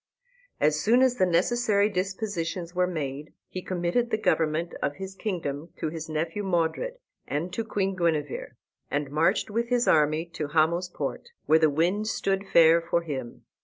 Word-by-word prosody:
As 150 0 +3
soon 235 +10 +4
as 250 -1 +2
the 185 - +3
necessary 200 +4 +2
dispositions 185 -3 -3
were 180 0 +2
made 150 -4 -4 0.2
he 185 - -5
committed 185 +7 -1
the 220 - +1
government 165 -5 0
of 145 - -1
his 190 0 -7
kingdom 170 -6 -4
to 160 - -2
his 160 0 -6
nephew 165 +5 -2
Modred 190 - -1 0.3
and 170 +5 -3
to 225 - -1
Queen 195 -3 -1
Guenever, 160 -5 -1 0.3
and 145 -1 -2
marched 165 +8 +1
with 235 +2 -1
his 245 -1 +2
army 155 +1 +3
to 150 - -3
Hamo's 165 +4 +2
Port, 330 - -5 0.2
where 160 +1 +5
the 160 -1 +4
wind 175 +8 +1
stood 195 -2 -1
fair 165 0 +6
for 170 0 0
him. 130 -7 -6
170 Hz, 165 wpm, -27 LUFS, 155-200 Hz, 0.3 s, fair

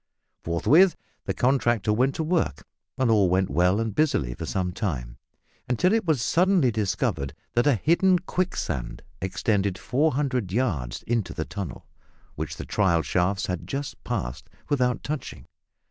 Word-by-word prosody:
Forthwith 155 - +4 0.3
the - - -1
contractor 120 -5 +2
went 130 +5 +1
to 160 - -1
work, 170 +2 -1 0.3
and 130 -3 +2
all 100 -4 +4
went 95 -1 +1
well 90 +7 +3
and 115 -2 -2
busily 130 - +1
for - - -6
some 90 -2 -1
time, 65 - -4 0.5
until 180 - +2
it 225 -3 +1
was 150 -8 +1
suddenly 175 -4 +3
discovered 100 - -1 0.2
that 120 +4 +2
a 140 - +5
hidden 175 - +3
quicksand 85 - -3 0.2
extended 95 +1 0
400 130 - 0
yards 90 - -1
into 115 -3 -1
the 80 - -2
tunnel, 95 -1 -6 0.5
which - - -5
the - - -6
trial 85 -6 +2
shafts 90 +2 0
had 90 -2 -4
just 140 +1 -5
passed 60 +5 -4 0.2
without 125 -4 +1
touching. 150 -2 -5
110 Hz, 145 wpm, -25 LUFS, 90-140 Hz, 0.5 s, a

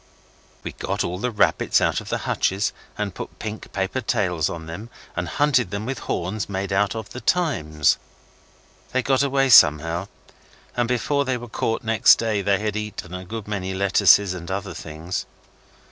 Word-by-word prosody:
We - - -4
got - - -2
all 90 +1 -3
the 125 - -1
rabbits 110 - +2
out - - +1
of - - -10
the - - 0
hutches 95 +2 0 0.2
and - - -2
put - - -8
pink 110 0 -7
paper 95 +7 -2
tails 95 -8 0
on 85 - -5
to - - -10
them, 90 +8 -8 0.3
and 85 0 -2
hunted 135 -8 +2
them 100 +2 -4
with 130 -1 -3
horns 95 +5 -2
made 95 0 -3
out 100 +2 +1
of 110 -2 -6
The 125 - -7
Times. 80 - +1 0.9
They 130 0 +1
got 135 -1 +2
away 135 -1 +2
somehow, 80 - +6 0.7
and 120 -1 +1
before 140 +4 +1
they 130 -2 -1
were 120 0 -8
caught 115 0 -2
next 110 -2 +6
day 110 -3 -1
they 100 0 +2
had 105 0 -2
eaten 105 -4 -5
a 90 0 -5
good 110 +3 -7
many 95 -3 -3
lettuces 100 0 +5
and 85 -2 -7
other 95 0 -3
things. 80 +2 -5
100 Hz, 180 wpm, -23 LUFS, 90-115 Hz, 0.9 s, somehow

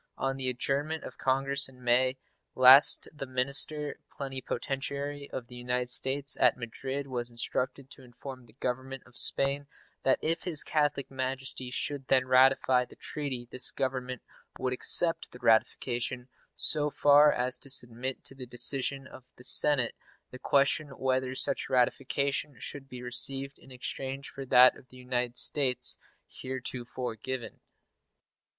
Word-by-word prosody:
On 135 0 -2
the 130 -1 -1
adjournment 140 +5 -2
of - - -11
Congress 135 +1 +1
in 125 -1 -18
May 130 +2 +2 0.4
last 130 +2 +8
the 140 -3 -8
minister 140 +3 0
plenipotentiary 140 +1 -5
of 120 -2 -7
the 125 - -13
United 125 0 -3
States 135 +2 +1
at - - +3
Madrid 130 +4 -6
was 125 -3 -4
instructed 130 +3 -4
to - - -11
inform 130 0 -12
the 110 - -21
Government 130 +1 -5
of 125 - -20
Spain 140 +1 +2 0.3
that 130 - +2
if 165 +2 0
His 165 -5 +5
Catholic 145 -3 -1
Majesty 130 -1 -5
should 135 +1 -4
then 130 -1 +2
ratify 130 0 +3
the - - -15
treaty 130 -5 -4
this 130 - +1
Government 125 -1 -4 0.3
would 130 0 -2
accept 165 +6 +3
the - - -12
ratification 120 +2 -1 0.3
so 150 -1 +4
far 145 +1 +5
as 125 +1 -1
to 140 - -8
submit 125 0 +3
to - - -4
the 130 -2 -10
decision 135 +2 +3
of 130 0 -15
the 125 - -17
Senate 135 -3 +4 0.4
the 130 - -11
question 140 +3 +1
whether 130 0 -1
such - - -1
ratification 140 +3 0
should 135 -1 -9
be 125 -1 -10
received 135 +3 0
in - - -18
exchange 135 +1 -5
for 135 -1 -9
that 125 0 +6
of 130 - -18
the 130 - -17
United 125 -1 -3
States 135 -4 0 0.3
heretofore 125 -2 -6
given. 130 +3 -7
130 Hz, 145 wpm, -28 LUFS, 125-140 Hz, 0.4 s, last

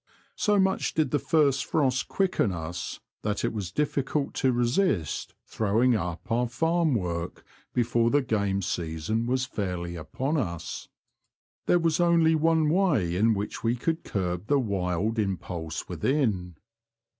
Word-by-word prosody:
So 210 -1 +2
much 190 -1 +1
did 155 -4 +1
the 145 - +2
first 150 -5 +2
frosts 135 -4 +1
quicken 185 - 0
us 85 +1 -5 0.2
that 105 -1 -1
it - - -1
was 100 -5 -4
dfficult 145 +1 -1
to 130 - +4
resist 120 - 0
throwing 115 +4 +2
up 90 +2 -4
our 120 +2 +2
farm 160 +3 +1
work 85 -4 -3 0.3
before 120 -1 +2
the 145 +2 +3
game 100 -4 0
season 85 +8 -2
was 130 +1 +1
fairly 90 -6 -4
upon 130 - -2
us. 85 - -4 0.8
There 175 - +5
was 165 -1 +1
only 170 -2 +4
one 160 0 +3
way 150 - +2
in 110 +4 +3
which 100 +1 -4
we 115 +1 +2
could 165 +7 -2
curb 90 0 -3
the 145 - +3
wild 100 -1 -1
impulse 90 -5 -3
within. 95 - 0
115 Hz, 145 wpm, -27 LUFS, 90-150 Hz, 0.8 s, There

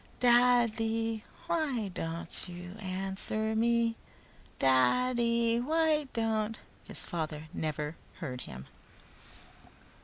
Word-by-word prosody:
"Dad 240 -2 +5
dy 225 -1 -1 0.2
why 275 -11 0
don't 165 0 -5
you 175 0 -8
an 190 -1 -3
swer 220 +2 -1
me 230 0 +2 0.6
Da 135 - +4
ddy 235 -1 +2
why 310 0 +2
don't 225 -1 0 0.2
" - - -29
His - - -6
father 155 -2 -4
never 150 -1 -2 0.2
heard 125 -1 -5
him. 65 0 -8
220 Hz, 110 wpm, -31 LUFS, 170-235 Hz, 0.6 s, Dad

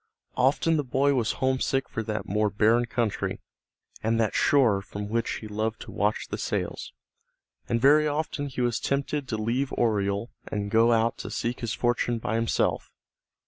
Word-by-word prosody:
Often 145 +5 +2
the 150 - 0
boy 135 +2 +2
was 120 -5 +1
homesick 130 0 0
for 115 - -4
that 110 -1 -4
more 105 +2 +1
barren 110 +4 +3
country, 115 -2 -1 0.6
and 115 +1 +1
that 110 -3 +1
shore 120 -9 +3
from 100 +1 -7
which 115 +1 -1
he 110 - -6
loved 110 +1 -2
to - - -9
watch 105 +1 -1
the - - -4
sails, - - -3 0.8
and 115 - +1
very 150 +4 +5
often 150 -1 -2
he 130 -2 -4
was 120 -1 +1
tempted 140 0 -1
to 110 - -2
leave 120 +5 -1
Oriel 105 -1 0 0.2
and 100 -1 -3
go 115 +1 +5
out 115 0 +2
to - - -6
seek 120 +1 -3
his 115 -1 -3
fortune 120 0 0
by 110 - -3
himself. 115 0 0
115 Hz, 175 wpm, -26 LUFS, 110-130 Hz, 0.8 s, very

